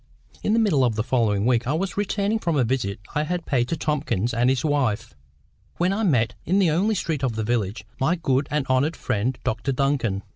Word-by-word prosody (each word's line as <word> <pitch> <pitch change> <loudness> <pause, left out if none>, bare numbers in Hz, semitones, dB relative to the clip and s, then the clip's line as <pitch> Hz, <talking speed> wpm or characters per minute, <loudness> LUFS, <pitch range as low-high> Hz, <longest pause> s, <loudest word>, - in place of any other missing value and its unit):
In 210 - +1
the 230 - +3
middle 180 -12 +3
of 120 -3 +1
the 110 - 0
following 115 -5 +1
week 120 -1 +2
I 140 - +1
was 180 +3 -2
returning 205 +1 0
from 170 -6 -1
a 135 - +3
visit 115 -5 -1
I 150 - +1
had 175 +2 -2
paid 125 -3 +1
to 165 - -2
Tomkins 140 - -1
and 120 +2 +2
his 130 +2 0
wife, 120 -7 0 0.6
when 180 +2 +2
I 210 - -1
met, 125 - +2
in 185 +4 +1
the 185 -5 +4
only 200 +7 +1
street 160 -6 -2
of 125 -4 0
the 110 - -1
village, 110 -2 -1
my 155 +7 +2
good 140 -5 0
and 150 -2 0
honoured 135 +5 +1
friend 120 +5 -1
Dr 120 +1 -1
Duncan. 130 -7 0
135 Hz, 220 wpm, -24 LUFS, 120-165 Hz, 0.6 s, the